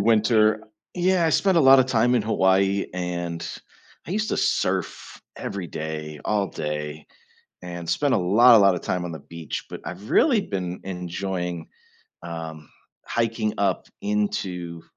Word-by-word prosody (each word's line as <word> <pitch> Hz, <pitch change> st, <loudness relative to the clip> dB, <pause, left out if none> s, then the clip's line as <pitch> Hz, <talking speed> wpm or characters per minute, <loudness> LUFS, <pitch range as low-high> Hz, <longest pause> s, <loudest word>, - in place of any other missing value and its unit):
winter 110 Hz, 0 st, +3 dB, 0.3 s
yeah, 180 Hz, -1 st, +2 dB
I 160 Hz, -, +2 dB
spent 190 Hz, +2 st, +3 dB
a -, -, +5 dB
lotta 135 Hz, -2 st, +8 dB
time 125 Hz, -1 st, +2 dB
in 115 Hz, -, +2 dB
Hawaii 95 Hz, -2 st, +2 dB
and 85 Hz, -2 st, -3 dB, 0.6 s
I 170 Hz, -, -4 dB
used 215 Hz, +2 st, -1 dB
to -, -, 0 dB
surf -, -, -1 dB
every 100 Hz, -3 st, -5 dB
day, 75 Hz, -1 st, -6 dB
all 105 Hz, -2 st, +1 dB
day, 75 Hz, -2 st, -5 dB, 0.6 s
and 85 Hz, -1 st, -6 dB
spend 145 Hz, -2 st, +1 dB
a -, -, +4 dB
lotta, 110 Hz, +5 st, +6 dB
lotta 100 Hz, -3 st, +5 dB
time 90 Hz, +1 st, -2 dB
on 85 Hz, -, -5 dB
the 80 Hz, -, -6 dB
beach, 80 Hz, +1 st, -7 dB
but -, -, -7 dB
I've 95 Hz, +5 st, -7 dB
really 250 Hz, -9 st, +4 dB
been 90 Hz, -, -4 dB
enjoying, 90 Hz, -2 st, -4 dB, 0.6 s
um, 80 Hz, -2 st, -7 dB, 0.4 s
hiking 115 Hz, -2 st, -1 dB
up 100 Hz, -2 st, 0 dB
into 100 Hz, -, -2 dB
95 Hz, 145 wpm, -24 LUFS, 85-115 Hz, 0.6 s, lotta